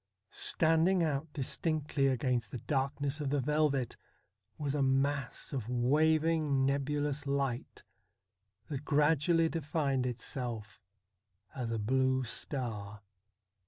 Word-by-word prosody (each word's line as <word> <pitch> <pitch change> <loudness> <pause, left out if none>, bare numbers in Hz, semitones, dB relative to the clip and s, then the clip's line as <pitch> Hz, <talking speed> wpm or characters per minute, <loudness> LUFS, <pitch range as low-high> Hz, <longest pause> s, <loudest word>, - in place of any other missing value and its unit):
Standing 165 +3 +3
out 150 0 -1
distinctly 150 0 0
against 125 -4 0
the 125 - -5
dark 135 +2 -1
ness 145 +1 -1
of 145 - -1
the 145 +1 +1
velvet 140 -2 +1 0.6
was 145 -2 -2
a 145 - 0
mass 135 +1 0
of 125 -4 -3
waving 150 +2 +2
nebulous 145 +1 -1
light, 140 -3 -2 0.8
that 145 -2 -4
gradually 160 +3 +3
defined 145 -5 -1
itself 115 -3 -4 0.7
as 125 -3 -3
a 115 - -1
blue 130 +4 +2
star. 110 -5 -4
140 Hz, 110 wpm, -32 LUFS, 130-150 Hz, 0.8 s, Standing